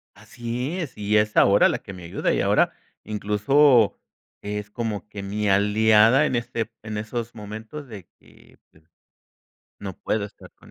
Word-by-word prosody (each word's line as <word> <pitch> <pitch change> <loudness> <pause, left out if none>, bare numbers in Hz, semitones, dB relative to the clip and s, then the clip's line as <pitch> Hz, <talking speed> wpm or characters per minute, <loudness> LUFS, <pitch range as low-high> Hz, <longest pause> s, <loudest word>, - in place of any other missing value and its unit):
Así 125 +7 -5
es, 160 -7 -6
y 105 +1 +1
es 105 0 +1
ahora 100 +1 +6
la - - -2
que 100 - -10
me 90 -1 -10
ayuda, 85 - -1
y - - +1
ahora - - +2 0.3
incluso 110 +4 +3 0.4
es 105 0 -5
como 110 -2 -4
que 105 -1 -8
mi 105 +2 -2
aliada 110 +6 +4
en 130 - -1
este 115 -2 -3
en 110 -1 -5
esos 115 +2 -5
momentos 110 +7 -8
de 100 -7 -11
que, - - -22
pues, 80 - -24 1.0
no 95 -3 -7
puedo 105 -2 -2
estar 100 - -13
con - - -19
105 Hz, 165 wpm, -24 LUFS, 105-120 Hz, 1.0 s, ahora